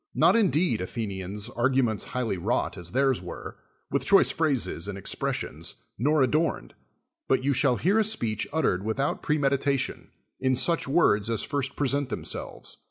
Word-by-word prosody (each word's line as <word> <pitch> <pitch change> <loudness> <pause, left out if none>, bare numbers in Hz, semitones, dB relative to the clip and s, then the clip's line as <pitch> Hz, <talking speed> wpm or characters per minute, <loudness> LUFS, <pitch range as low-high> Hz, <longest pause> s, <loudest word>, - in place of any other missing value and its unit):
Not - - +5
indeed, 180 - +2
Athenians, 100 0 -3
arguments 120 -3 +1
highly 125 -5 -2
wrought, 85 - -1
as 85 -1 -9
theirs 135 -3 +2
were, 90 - -8 0.3
with - - 0
choice - - +5
phrases 140 - -1
and 100 -1 -5
expres 95 - -2
sions, - - -6 0.2
nor 145 +3 +3
adorned, 155 +5 0 0.5
but 130 - +2
you 140 +1 +2
shall 130 -1 +3
hear 195 - +2
a - - +4
speech 115 - -1
uttered 145 - +1
without 110 +6 -1
premeditation, 140 -2 0 0.3
in 130 0 +2
such 165 +6 +1
words 115 -9 +3
as 115 -2 0
first 140 -1 -2
present 140 -1 0
themselves. - - -5
130 Hz, 155 wpm, -27 LUFS, 110-145 Hz, 0.5 s, Not